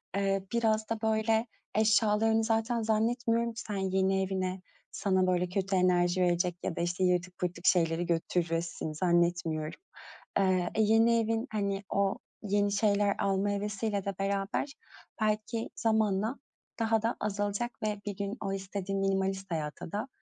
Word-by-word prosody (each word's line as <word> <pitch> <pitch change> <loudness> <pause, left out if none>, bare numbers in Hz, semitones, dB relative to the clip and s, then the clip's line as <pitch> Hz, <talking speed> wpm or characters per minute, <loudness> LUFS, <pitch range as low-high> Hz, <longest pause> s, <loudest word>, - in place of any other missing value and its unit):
eee, 195 -1 0
biraz 220 -2 +1
da 225 -1 -2
böyle 220 +1 +2 0.3
eşyalarını 220 +1 +3
zaten 225 +1 +1
zannetmiyorum 230 +1 +1
ki 230 - -6
sen 210 - -5
yeni 190 0 +1
evine 185 -1 -2 0.3
sana, 185 -2 +1
böyle, 180 0 +1
kötü 195 +1 -1
enerji 180 0 +3
verecek 175 0 +2
ya - - -2
da, - - -2
işte, 175 +2 -1
yırtık 180 0 +1
pırtık 180 0 -3
şeyleri 165 -1 +3
götüresin, 165 -1 -1
zannetmiyorum. 170 -2 0 0.6
Eee, 185 -2 +2
e, 220 - +3
yeni 225 +2 +4
evin, 225 +2 0
hani, 200 -2 -1
o 200 -1 +1 0.3
yeni 205 0 +1
şeyler 205 0 +2
alma 195 0 +1
hevesiyle 205 0 -2
de 200 -1 -2
beraber 195 +7 -1 0.5
belki 215 +2 -1
zamanla 220 +1 +1 0.4
daha 225 -1 +2
da 230 +2 +1
azalacak 205 +3 -1
ve 210 -1 -1
bir 205 -2 -4
gün 200 +3 -3
o 195 -1 -2
istediğin 195 0 -3
minimalist 195 0 -1
hayata 155 0 -4
da 210 +5 -3
200 Hz, 145 wpm, -30 LUFS, 185-220 Hz, 0.6 s, yeni